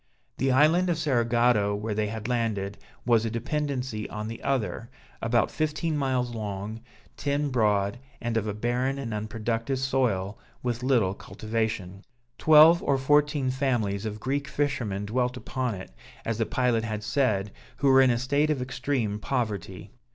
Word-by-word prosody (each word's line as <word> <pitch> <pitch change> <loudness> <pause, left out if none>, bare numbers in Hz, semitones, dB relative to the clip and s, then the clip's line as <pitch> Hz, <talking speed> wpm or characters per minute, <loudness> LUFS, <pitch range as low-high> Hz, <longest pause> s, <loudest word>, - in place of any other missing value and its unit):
The 135 0 +2
island 160 +7 +4
of 170 - +1
Cerigotto, 120 -7 +2
where 105 +1 -3
they 105 0 0
had 110 0 -5
landed, 105 -5 -1 0.3
was 115 -2 +4
a 115 - -1
dependency 130 -2 -3
on 105 0 -5
the 115 - -7
other, 120 -4 -2 0.3
about 115 0 +2
fifteen 155 +1 -1
miles 130 -4 0
long, 105 0 -5 0.4
ten 145 0 0
broad, 105 -3 +1 0.2
and 120 -1 -2
of 110 -1 0
a 105 - -1
barren 125 +5 0
and 125 -5 -4
unproductive 115 +4 -2
soil, 125 -7 0 0.2
with 120 -1 -2
little 120 -8 +2
cultivation. 110 -3 -4 0.4
Twelve 160 +2 +7
or 140 - +2
fourteen 145 0 +2
families 115 -6 0
of 105 0 -5
Greek 140 +4 -2
fishermen 130 -9 -1
dwelt 125 +3 -1
upon 125 -3 -3
it, 95 -6 -9 0.3
as 115 -1 -2
the 115 - +1
pilot 125 -3 +1
had 110 -1 -4
said, 110 -4 +1 0.3
who 140 - +1
were 135 0 +7
in 130 - +5
a 120 - +2
state 140 +5 +1
of 150 -3 +1
extreme 125 -4 -2
poverty. 105 -8 -3
120 Hz, 160 wpm, -27 LUFS, 105-135 Hz, 0.4 s, Twelve